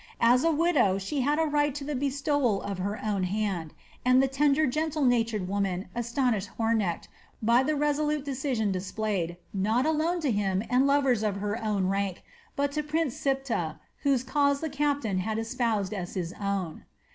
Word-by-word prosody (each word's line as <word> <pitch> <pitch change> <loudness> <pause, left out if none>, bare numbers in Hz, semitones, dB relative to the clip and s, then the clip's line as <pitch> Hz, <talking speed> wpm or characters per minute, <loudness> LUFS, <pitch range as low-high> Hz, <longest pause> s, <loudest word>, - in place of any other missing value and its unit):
As 245 +2 +5
a 330 - +4
widow 295 - +3
she 230 +9 -2
had 290 +4 +1
a 320 - +3
right 290 -2 +1
to 295 - -4
the 295 +1 -3
bestowal 275 -4 +1
of 200 -2 -4
her 200 +3 -2
own 205 -3 0
hand, 185 -4 -1 0.3
and 255 0 +4
the 270 - +4
tender, 285 +3 +2
gentle 305 +2 0
natured 225 -6 +1
woman 195 -2 -2
astonished 235 -3 0
Hornecht 225 -6 0 0.3
by 235 +3 +4
the 300 +3 0
resolute 295 0 0
decision 260 -6 -1
displayed, 185 -2 -2 0.2
not 215 +6 +1
alone 320 +3 +1
to 290 -5 +1
him 200 -2 0
and 255 +2 +4
lovers 275 -5 +3
of 210 -2 0
her 205 +3 -3
own 205 -3 0
rank, 195 -1 -1 0.3
but 280 0 0
to 300 +1 -1
Prince 300 -2 -1
Siptah, 270 - -1 0.2
whose 275 -4 +2
cause 280 +1 +2
the 315 -1 -4
captain 285 -9 0
had 215 +4 -2
espoused 225 -3 -1
as 185 -3 -5
his 175 -2 -3
own. 195 -5 -3
240 Hz, 175 wpm, -28 LUFS, 200-285 Hz, 0.3 s, As